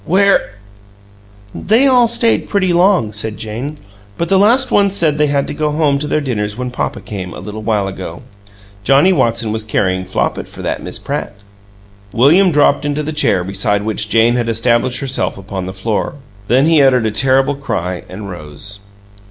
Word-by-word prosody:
"WHERE 195 - +2 0.5
" 100 0 -27
"They 225 +6 +2
all 250 -3 +5
stayed 230 0 +1
pretty 185 -3 +1
long," 175 - +3
said 105 +1 -4
Jane, 120 +8 -5 0.4
"but 170 - -2
the 195 - +4
last 245 +6 +3
ones 200 -1 +3
said 155 -5 +1
they 150 - +3
had 140 -1 0
to - - -5
go 155 -1 -1
home 150 -2 +1
to 150 - -3
their 155 - 0
dinners 105 -6 -3
when 125 0 -4
papa 125 - -3
came, 95 -4 -7
a - - -8
little 105 +1 -7
while 105 -3 0
ago. 95 -3 -7 0.6
Johnnie 140 - +4
Watson 115 -7 +1
was 110 0 -2
carryin' 95 -3 -1
Flopit - - -2
for - - -11
that - - -2
Miss - - -6
Pratt." - - -4 0.8
William 170 +10 +5
dropped 145 -1 +3
into 145 +1 -2
the 155 +2 -4
chair 120 -11 +1
beside 100 +2 -1
which 105 -1 -2
Jane 115 +2 +3
had 120 -1 -1
established 120 +2 +1
herself 135 -6 -2
upon 95 -1 -6
the - - -4
floor. 100 +7 -2 0.3
Then 130 +5 +3
he 160 -2 +4
uttered 130 -4 +3
a 110 - 0
terrible 135 +5 +2
cry 90 -11 -4
and 100 +2 -8
rose. 90 +3 -7
120 Hz, 185 wpm, -16 LUFS, 105-150 Hz, 0.8 s, all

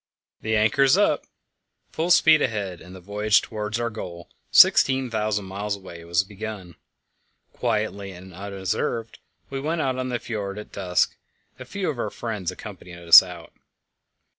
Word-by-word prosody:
"The 110 0 -1
anchor's 120 +6 +4
up!" - - +1 0.6
Full 165 +2 -2
speed 160 -3 +6
ahead, 100 -7 -2
and 90 +1 -12
the - - -10
voyage 105 +3 +2
towards 105 0 -4
our 120 0 -2
goal, 85 -5 -8 0.2
16,000 110 -6 +4
miles 100 +2 -3
away, 90 -4 -11
was 85 +3 +1
begun. 100 -3 -8 0.8
Quietly 105 -4 -2
and 95 +1 -12
unobserved 100 +4 -4 0.3
we 135 - -3
went 160 +4 -2
out 130 -2 -1
of 130 0 -3
the 125 - -1
fjord 105 -4 -5
at 105 - -9
dusk; 90 -3 0 0.4
a 130 - -8
few 195 +8 -4
of 145 -6 -3
our - - -2
friends 105 -7 -4
accompanied 85 -1 -10
us 85 -1 +9
out. - - -11
105 Hz, 150 wpm, -24 LUFS, 95-120 Hz, 0.8 s, us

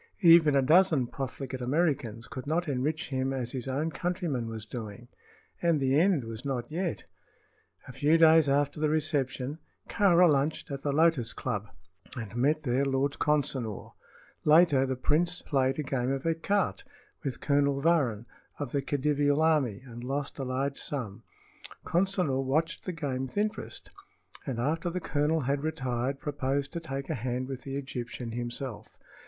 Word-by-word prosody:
Even 165 -4 +7
a 135 - +4
dozen 160 -2 +4
profligate 130 0 -5
Americans 125 -5 0
could 130 +1 -7
not 170 +3 0
enrich 150 +5 -1
him 130 -1 -1
as 125 -3 -3
his 130 -1 -5
own 145 +5 -1
countryman 170 - -2
was 110 -1 -6
doing. 115 +1 -8 0.5
And 170 -3 +3
the 135 +1 +3
end 175 -6 +3
was 115 +1 -7
not 130 -2 -3
yet. 175 +1 -2 0.8
A - - -7
few 150 +5 +3
days 160 -2 +6
after 145 +2 +1
the 155 0 +2
reception 145 -2 -1 0.3
Kāra 180 -3 +5
lunched 145 0 0
at 140 0 -4
the 145 - -1
Lotus 150 -6 +2
Club 105 0 -3 0.5
and 110 -4 -6
met 150 +6 +2
there 130 0 +1
Lord 135 +1 0
Consinor. 135 -8 -1 0.5
Later 150 -4 +5
the 130 - -1
prince 165 +7 0
played 135 -2 +1
a 155 - -1
game 130 -2 -1
of 135 0 -2
écarté 165 +5 0 0.4
with 135 -4 -3
Colonel 140 -1 +2
Varrin, 140 -9 +2 0.3
of 145 -4 -4
the 140 - 0
Khedivial 145 +1 +1
army, 135 -9 +2
and 120 -1 -9
lost 140 +3 -3
a - - -1
large 135 +2 -2
sum. 120 -9 -4 0.6
Consinor 175 -7 +1
watched 155 +6 -1
the 185 - -2
game 135 -5 -3
with 130 - -13
interest, 215 +1 -3 0.6
and 130 -4 -2
after 160 +8 0
the 180 +2 -3
colonel 160 -1 0
had 140 +1 0
retired 135 -4 -2
proposed 140 -2 -2
to 170 - -2
take 135 -4 -5
a - - -1
hand 125 +2 -3
with 130 -1 -6
the 135 0 -6
Egyptian 125 -3 -5
himself. 120 -1 -5
140 Hz, 160 wpm, -29 LUFS, 130-155 Hz, 0.8 s, Even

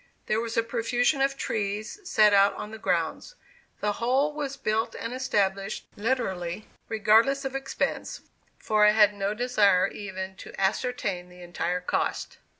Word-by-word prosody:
There 215 - +1
was 230 0 -4
a 230 - +4
profusion 245 +4 0
of 275 0 +1
trees 215 - -3
set 215 - +4
out 200 0 +5
on 210 0 -7
the 220 - -8
grounds. 175 - -1 0.5
The 210 - +1
whole 270 +5 +2
was 285 -2 -4
built 220 -2 -1
and 230 +1 -5
established 200 -6 -1
literally 205 -5 -2 0.2
"regardless 225 +6 +3
of 270 - -3
expense," 270 - -3 0.4
for 215 -1 +2
I 210 0 +6
had 210 -1 +5
no 200 +1 -2
desire 210 -6 +3
even 190 -2 -6
to - - -10
ascertain 195 -3 -1
the 180 0 -13
entire 175 +1 -2
cost. 180 - -2
215 Hz, 150 wpm, -27 LUFS, 195-250 Hz, 0.5 s, I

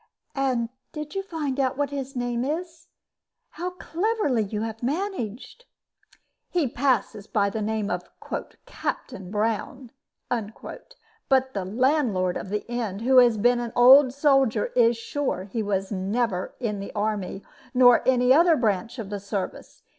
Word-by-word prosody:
"And 255 -4 0 0.2
did 300 0 -6
you 390 - -1
find 305 -8 -4
out 260 -1 +1
what 285 -1 -1
his 275 -1 -5
name 245 -1 -1
is? 335 +4 -4 0.6
How 355 +2 -4
cleverly 360 - -1
you 210 0 -3
have 225 0 -5
managed!" 275 - -4 0.8
"He 340 -6 +1
passes 240 -5 0
by 200 -1 +1
the 220 - -3
name 215 -1 -1
of - - -4 0.6
'Captain 250 - -5
Brown;' 225 +4 -2 0.4
but 265 - -3
the 195 -3 -3
landlord 220 - +1
of - - -5
his 210 +1 -2
inn, 235 -5 -3
who 260 +2 +3
has 240 -3 +6
been 240 +3 +3
an 235 -1 -4
old 260 +2 +8
soldier, 270 -5 +2
is 235 -1 +4
sure 260 -4 -2
he 205 +4 -4
was 195 -1 -2
never 195 0 -1
in 215 -5 -2
the 200 - -6
army, 205 -2 -2 0.3
nor 245 -1 +7
any 250 0 +4
other 335 +3 +5
branch 220 +1 -1
of 210 -4 -6
the 205 - -3
service. 200 -1 -6
245 Hz, 145 wpm, -25 LUFS, 210-280 Hz, 0.8 s, old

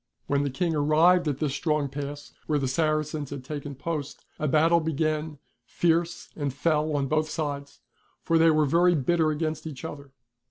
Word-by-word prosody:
When 140 0 +1
the 145 - 0
King 165 +6 -1
arrived 160 +4 +4
at 145 -3 0
this 145 -2 -1
strong 150 -1 0
pass 145 +1 -7
where 150 - +2
the 135 -2 -1
Saracens 155 0 -1
had 140 -2 -6
taken 145 0 -6
post, 145 -1 -5
a 155 - 0
battle 160 +4 +4
began, 155 -1 -1 0.3
fierce 170 0 0
and 145 -3 -2
fell 155 +2 0
on 140 -1 +1
both 155 +2 0
sides, 140 -3 -4 0.4
for 165 0 +2
they 165 0 +6
were 155 -1 +3
very 175 +4 +4
bitter 160 +2 +2
against 155 +1 -2
each 150 -1 -7
other. 140 -3 -8
155 Hz, 175 wpm, -26 LUFS, 145-160 Hz, 0.4 s, they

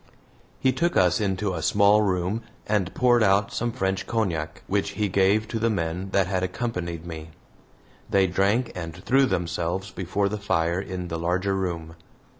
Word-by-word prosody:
He 130 - +3
took 170 +7 0
us 90 +1 +3
into 95 -1 -1
a 80 - -3
small 100 +5 +4
room 95 +2 0 0.2
and 105 -4 0
poured 120 -1 +4
out 100 -1 +3
some 120 0 -1
French 95 -6 -2
cognac, 90 -9 -2
which 100 0 -1
he 105 -1 +1
gave 100 +3 +3
to 115 - -2
the 115 +1 +2
men 90 -1 -2
that 95 0 +2
had 95 0 -1
accompanied 90 -4 -3
me. 80 -2 -7 0.8
They 95 -1 +4
drank 100 +7 +1
and 85 -3 -6
threw 130 +10 +2
themselves 85 +1 -2
before 95 +2 -1
the 105 +1 -3
fire 85 -2 0
in 90 -2 -5
the 85 0 -3
larger 90 +3 0
room. 85 -4 -3
95 Hz, 170 wpm, -25 LUFS, 90-105 Hz, 0.8 s, small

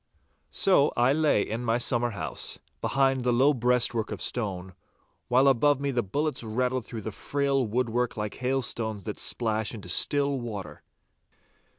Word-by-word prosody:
So 165 -7 +3
I 120 +3 +4
lay 150 -8 +2
in 115 +3 -4
my 115 0 +1
summer 120 0 +1
house, 105 - -2 0.2
behind 135 -2 +1
the 125 - +2
low 135 +5 +4
breastwork 120 -2 +1
of - - -5
stone, 95 -6 -3 0.5
while 130 +3 +4
above 135 +2 +3
me 140 0 -1
the 120 -2 +1
bullets 145 +8 -2
rattled 125 +2 -1
through 115 -2 -6
the 110 - -4
frail 140 +2 -1
woodwork 120 +1 -1
like 105 -1 -4
hailstones 120 -5 -2
that - - -6
splash 110 -1 -1
into 105 - -9
still 140 -1 +3
water. 100 -10 -7
125 Hz, 155 wpm, -27 LUFS, 110-135 Hz, 0.5 s, I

